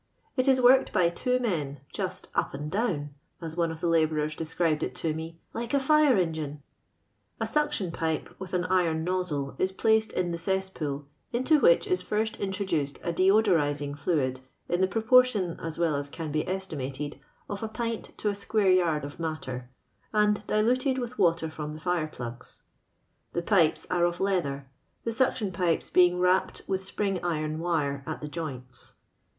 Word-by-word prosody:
It 255 0 +1
is 265 -1 +5
worked 255 +1 +6
by 180 -4 +3
two 250 +8 0
men, 150 - -2
''just 185 -2 -3
up - - 0
and 150 +2 -5
dowot^ai 160 - -3
one 170 -1 +1
of 160 0 -8
the 175 - +1
labourers 155 -2 +2
described 165 -1 0
it - - -3
to 160 -2 -1
me, 165 +1 -7
lilDBi 240 +4 0
fire 295 -2 +4
engine." 155 -5 -2 0.8
A - - 0
suction 295 - 0
pipe, 160 -1 -2
with 190 -1 -5
an 180 - +1
iroa 180 -3 +2
nozzle, 160 -6 -1
is 185 - +2
placed 220 +3 +2
in 175 -1 0
the 170 - -3
cesspool, 165 -6 -1 0.3
into 260 +6 +3
whisk - - +5
ii 390 - +1
fli 220 -11 0
st 220 - -8
introduced 185 -8 -1
a 170 - -1
deodorising 165 -8 +3
fluid* 140 -5 0 0.3
in 175 +1 0
the 190 - +4
pro* 220 +3 -2
portion, 225 -7 +4
as 165 -1 -2
well 170 -2 +2
as 140 0 -2
can 160 0 -5
be 155 +1 -1
estimated, 150 -7 -4 0.3
of 205 - -5
a 220 - -3
piat 230 0 -4
to 210 - 0
a - - 0
square 205 -1 +2
yard 165 -5 +2
of 145 +2 -9
matter, 130 -6 -4 0.4
and 210 -1 +2
diluted 255 +5 +2
sxA 245 -1 -4
water 165 -3 +3
from 150 -1 -6
the 155 - -8
fire 175 -1 0
plugs. 120 -5 -9 0.7
Tho 175 - 0
pipes 170 -4 +3
are 175 -1 +3
of 175 0 -1
leather, 175 -8 0 0.4
the 230 - -1
snction 225 -4 +1
pipei 175 -2 0
being 180 0 +5
wrapped 180 +1 +2
with 190 -1 -2
spring 195 -1 -2
iron 155 -2 -1
wire 150 -5 -1
at 155 - -4
the 150 - -6
joints. 135 -6 -6
175 Hz, 175 wpm, -28 LUFS, 155-205 Hz, 0.8 s, worked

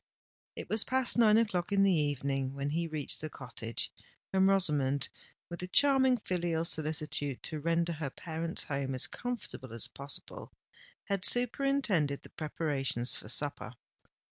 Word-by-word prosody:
It - - -7
was 215 0 +2
past 260 -2 +3
nine 215 -2 +6
o'clock 205 -4 0
in 200 -1 +4
the 195 - +5
evening 140 -3 -1
when 140 +1 -2
he 165 +2 -1
reached 155 -3 -4
the 155 - -4
cottage; 115 -5 -4 0.4
and 190 0 +4
Rosamond, 150 -8 +2 0.4
with 175 0 -7
a 180 - -4
charming 265 +3 +4
filial 175 -5 -1
solicitude 155 -4 0
to 155 - -3
render 170 +2 0
her 150 -3 -4
parent's 165 +3 -3
home 140 -2 -2
as 130 - +2
comfortable 240 - -6
as 115 - -1
possible, 140 +1 -8 0.5
had 200 -2 -2
superintended 245 - +2
the - - -13
preparations 140 -6 0
for 105 - -7
supper. 140 0 -1
160 Hz, 145 wpm, -31 LUFS, 140-195 Hz, 0.5 s, nine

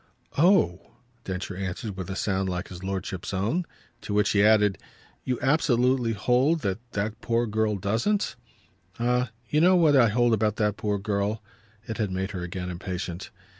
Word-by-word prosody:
"Oh!" 155 - +3 0.3
Densher 95 0 -4
answered 95 +2 -4
with 95 -1 -6
a 95 - -3
sound 95 -1 -1
like 90 0 -4
his 90 0 -9
lordship's 95 0 -4
own. 115 - -1 0.3
To 105 - -4
which 105 0 +3
he 100 - +3
added: 105 -2 +4 0.4
"You 125 -1 -1
absolutely 125 -4 +2
hold 125 - +2
that 100 0 -1
that 105 +3 -3
poor 115 +1 +1
girl 110 -1 0
doesn't?" 115 - 0 0.6
"Ah 125 +1 +1 0.2
you 150 +5 +2
know 185 +2 +6
what 160 -5 +5
I 120 -4 +6
hold 120 +2 +2
about 110 -1 +1
that 105 -2 0
poor 105 -1 -1
girl!" 105 +2 -2 0.4
It 110 - -5
had 105 -3 0
made 95 +1 -3
her 95 -4 -5
again 90 +1 -4
impatient. 90 0 -5
105 Hz, 170 wpm, -26 LUFS, 95-120 Hz, 0.6 s, know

